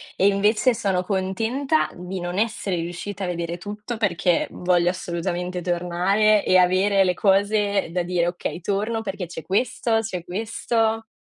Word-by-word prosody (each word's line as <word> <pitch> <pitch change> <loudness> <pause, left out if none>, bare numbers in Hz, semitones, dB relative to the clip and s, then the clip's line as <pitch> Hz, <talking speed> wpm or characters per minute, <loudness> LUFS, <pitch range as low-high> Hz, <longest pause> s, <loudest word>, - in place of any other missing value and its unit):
e 195 - +3
invece 210 +5 +3
sono 190 -4 0
contenta 225 - 0
di 180 +1 -6
non 175 +1 -4
essere 215 -3 -1
riuscita 175 +4 -5
a - - -1
vedere 170 -1 -3
tutto, 210 +5 -6
perché 180 -5 +1
voglio 175 -1 +2
assolutamente 180 0 -3
tornare 180 +5 +2
e 185 - +5
avere 190 +2 +4
le 180 -1 +1
cose 200 0 +2
da 180 0 0
dire: 175 -1 0
"Okay, 175 0 -4
torno 210 +5 -1
perché 195 -3 -4
c'è 165 -1 -8
questo, 225 - 0
c'è 185 -6 -5
questo", 225 +3 -1
190 Hz, 150 wpm, -23 LUFS, 180-215 Hz, -, e